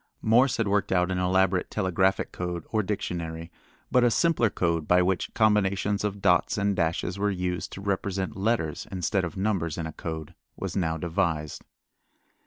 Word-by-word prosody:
Morse 120 +4 +4
had 115 - 0
worked 100 0 +1
out 90 0 +2
an 90 - -1
elaborate 95 0 +2
telegraphic 95 -1 +1
code 90 -2 -4
or 110 - +2
dictionary, 85 -4 -4 0.4
but 125 - +4
a 120 - +5
simpler 135 -3 +2
code 85 -5 -1
by 90 - +5
which 90 +1 0
combinations 105 -2 +2
of 100 -1 -3
dots 90 +1 +3
and 100 -1 +1
dashes 85 +2 -1
were 105 +1 +1
used 90 -2 -2
to 95 - -8
represent 95 -1 -2
letters 95 -7 -1
instead 95 +1 0
of 85 -1 -5
numbers 95 -6 -1
in 85 - -3
a 80 - -6
code 80 -1 -6 0.2
was - - -4
now 80 -4 0
devised. 80 -3 -2
95 Hz, 170 wpm, -27 LUFS, 85-100 Hz, 0.4 s, a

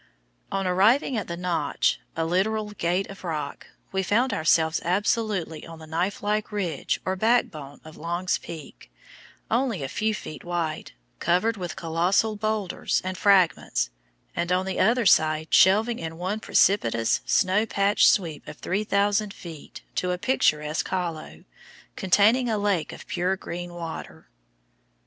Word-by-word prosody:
On 195 0 -1
arriving 215 +10 +3
at 220 - -2
the 170 - -5
"Notch" 180 -1 0 0.2
(a 165 - -1
literal 210 +5 0
gate 185 -1 -1
of 195 - -12
rock), 150 -5 -4 0.2
we 190 - 0
found 225 +6 +1
ourselves 160 -2 +2
absolutely 190 -3 0
on 165 -1 -10
the 160 - -11
knifelike 205 +6 -1
ridge 180 -8 -2
or 190 - 0
backbone 185 - 0
of 155 - -12
Long's 175 +3 -1
Peak, 160 -4 -10 0.6
only 230 - 0
a - - -2
few 215 +9 -1
feet 155 -8 -8
wide, 170 -3 -3 0.3
covered 185 +6 +2
with 180 -4 -5
colossal 175 +7 +1
boulders 215 -2 -1
and 185 0 -3
fragments, 175 - +2 0.4
and 170 +1 -1
on 185 +1 +2
the 190 - -3
other 235 +3 +3
side 155 -3 +3
shelving 220 +5 +5
in 160 0 -6
one 190 +5 -2
precipitous, 115 - +2
snow 205 +4 +2
patched 200 0 +3
sweep 165 -7 +1
of - - -8
3,000 205 +1 0
feet 165 -6 -11
to 180 - -1
a 180 - 0
picturesque 155 - +1
hollow, 170 -4 -4 0.5
containing 215 +6 +3
a 220 - +1
lake 200 -6 0
of - - -10
pure 185 +2 -1
green 175 -1 -6
water. 170 -2 -8
185 Hz, 145 wpm, -25 LUFS, 165-210 Hz, 0.6 s, shelving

